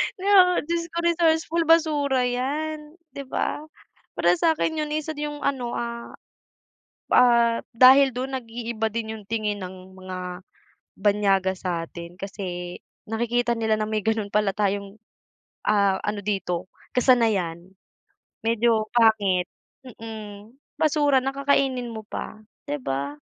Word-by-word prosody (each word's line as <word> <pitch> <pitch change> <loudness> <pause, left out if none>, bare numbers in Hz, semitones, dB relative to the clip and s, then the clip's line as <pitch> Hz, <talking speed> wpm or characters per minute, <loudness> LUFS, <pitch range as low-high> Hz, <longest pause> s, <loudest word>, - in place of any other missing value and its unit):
'Di 375 - -11
ba, 400 - +8 0.2
dios 335 +2 -2
ko 340 - -5
resourceful, 335 -1 +2
basura 295 -5 +3
'yan, 300 +5 -3 0.2
'di 280 - -5
ba? 260 - -2 0.6
Para 170 0 +3
sa'kin 320 -1 +1
yun 300 0 -2
isa 310 +1 -3
dun 295 +1 -3
yung - - -9
ano, 250 -4 -1
ah, 235 0 -5 1.0
ah, 235 -1 +5 0.2
dahil 265 +3 +8
dun, 260 +2 -3
nag-iiba 230 -2 -3
din 220 -1 -3
yung 210 - -12
tingin 210 -2 -2
ng 185 0 -10
mga 185 0 -7 0.8
banyaga 195 -2 +2
sa 170 -3 -3
atin 170 0 -10
kasi 180 -3 -6 0.3
nakikita 235 +1 0
nila 220 -1 +1
na 215 - -1
may 215 -1 -1
gano'n 220 -2 0
pala 210 -1 +1
tayong, 200 0 -2 0.7
ah, 200 -2 +3
ano 210 0 -2
dito 190 -3 -2 0.2
kasanayan. 220 -10 +2 0.8
Medyo 225 -1 +2
pangit, 205 -6 +3 0.4
mm, 215 -3 -9 0.3
basura 290 -3 +3
na, 270 - -1
kakainin 270 -3 +1
mo 220 -1 -7
pa, 215 - -7 0.3
'di 290 +1 -2
ba? 140 +2 -3
225 Hz, 130 wpm, -24 LUFS, 200-275 Hz, 1.0 s, ba